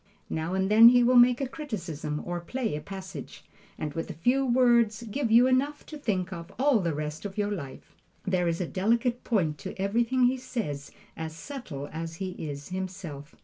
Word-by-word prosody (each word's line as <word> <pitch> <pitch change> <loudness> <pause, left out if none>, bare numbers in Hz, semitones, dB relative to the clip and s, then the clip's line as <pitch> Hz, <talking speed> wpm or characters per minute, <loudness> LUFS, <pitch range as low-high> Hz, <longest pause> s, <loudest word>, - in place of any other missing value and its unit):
Now 160 +3 -2
and 190 +1 0
then 225 +2 +10
he 245 0 +5
will 250 +1 +4
make 245 0 +7
a 270 - 0
criticism 165 - -5
or 175 0 -3
play 225 - -3
a 150 - -4
passage, 190 +3 -8 0.3
and 150 -2 -4
with 165 - -4
a - - -6
few 245 - +2
words 240 -3 +3
give 235 +3 -2
you 235 +3 +7
enough 270 +3 +1
to 310 - -9
think 195 -9 -2
of 170 +1 -8
all 270 -3 +4
the 170 -4 0
rest 150 +1 -4
of 200 -1 -6
your 205 0 0
life. 140 -10 -7 0.3
There 185 -2 +1
is 165 0 0
a 180 - 0
delicate 235 +7 0
point 165 - 0
to 135 - -7
everything 235 +6 +1
he 250 +2 +4
says 150 - -4 0.3
as 160 -1 -5
subtle 165 - -7
as 165 0 -5
he 190 +2 -4 0.2
is 140 0 -7
himself. 180 -6 -6
195 Hz, 195 wpm, -28 LUFS, 165-245 Hz, 0.3 s, then